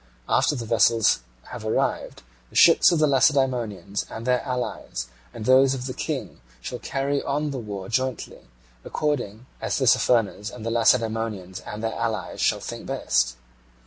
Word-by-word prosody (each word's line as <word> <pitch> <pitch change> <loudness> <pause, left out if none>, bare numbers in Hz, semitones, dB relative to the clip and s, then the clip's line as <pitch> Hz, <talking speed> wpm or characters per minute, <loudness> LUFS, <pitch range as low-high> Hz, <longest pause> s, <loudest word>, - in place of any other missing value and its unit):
After 150 - +2
the 120 -4 -4
vessels 115 - +3 0.3
have 120 -3 -7
arrived, 110 - -1 0.3
the - - -19
ships - - +7
of 170 - +2
the 155 - +4
Lacedaemonians 130 -8 +1
and 110 - -7
of - - -9
their 125 -1 +2
allies 125 - -4 0.3
and 105 - -8
those 130 +1 +5
of 125 -1 -6
the 130 - -4
King - - -5 0.2
shall - - -6
carry 140 +1 -1
on 145 +1 -2
the 135 - -4
war 100 -4 -6
jointly, 130 - -3 0.4
according 125 -7 -2 0.2
as - - -1
Tissaphernes 115 -5 +2
and 110 - -9
the 115 - -1
Lacedaemonians 115 -5 +1
and 105 +1 -8
their 115 - -1
allies 110 -5 -3
shall - - +2
think - - -7
best. - - 0
115 Hz, 160 wpm, -24 LUFS, 110-130 Hz, 0.4 s, ships